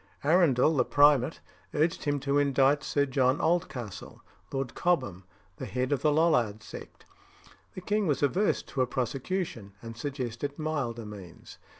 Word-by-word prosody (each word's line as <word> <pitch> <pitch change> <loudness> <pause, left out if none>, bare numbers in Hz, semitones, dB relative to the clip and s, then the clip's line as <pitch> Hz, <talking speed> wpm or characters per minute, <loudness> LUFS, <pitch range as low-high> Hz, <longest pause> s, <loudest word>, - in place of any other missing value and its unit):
Arundel, 155 -2 +4
the 130 - +3
primate, 145 0 +3 0.3
urged 160 +2 0
him 145 -1 0
to 140 +1 +1
indict 140 +1 +3
Sir 145 -1 +1
John 130 0 +1
Oldcastle, 125 - -2 0.3
Lord 135 -3 -3
Cobham, 100 - -1 0.3
the - - -6
head 130 +1 -2
of 145 - +1
the 155 - +3
Lollard 125 -10 +2
sect. 100 - -11 0.7
The 185 - -6
king 205 +1 0
was 145 -2 0
averse 185 +9 +1
to 135 - -3
a 130 - +2
prosecution, 130 - -3
and 115 +1 -9
suggested 135 +1 -4
milder 135 -8 -3
means. 100 -5 -11
140 Hz, 150 wpm, -28 LUFS, 120-155 Hz, 0.7 s, Arundel